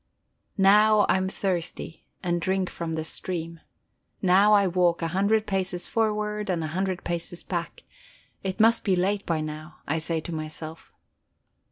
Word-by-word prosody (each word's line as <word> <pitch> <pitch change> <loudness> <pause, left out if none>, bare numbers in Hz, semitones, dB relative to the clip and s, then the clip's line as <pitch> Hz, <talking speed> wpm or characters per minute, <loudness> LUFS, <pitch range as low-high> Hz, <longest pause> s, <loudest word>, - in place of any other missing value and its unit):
Now 210 +2 +6
I 200 - +3
am 190 0 -1
thirsty, 180 -4 -3 0.2
and 175 -1 0
drink 190 +1 -1
from 165 -1 -4
the 160 - -2
stream; 165 0 -3 0.6
now 195 +3 +4
I 200 -1 +5
walk 175 -2 +1
a 165 - 0
hundred 200 +5 +1
paces 190 -2 -1
forward 210 -2 -1
and 170 -3 0
a - - -2
hundred 190 0 -2
paces 170 0 -3
back; - - -5 0.6
it 190 +2 -3
must 225 +1 +5
be 195 -3 +2
late 195 +3 0
by 165 -2 0
now, 155 +1 -7
I 160 +3 0
say 160 +1 -2
to 165 +2 -6
myself. 155 +1 -7
185 Hz, 160 wpm, -26 LUFS, 165-200 Hz, 0.6 s, Now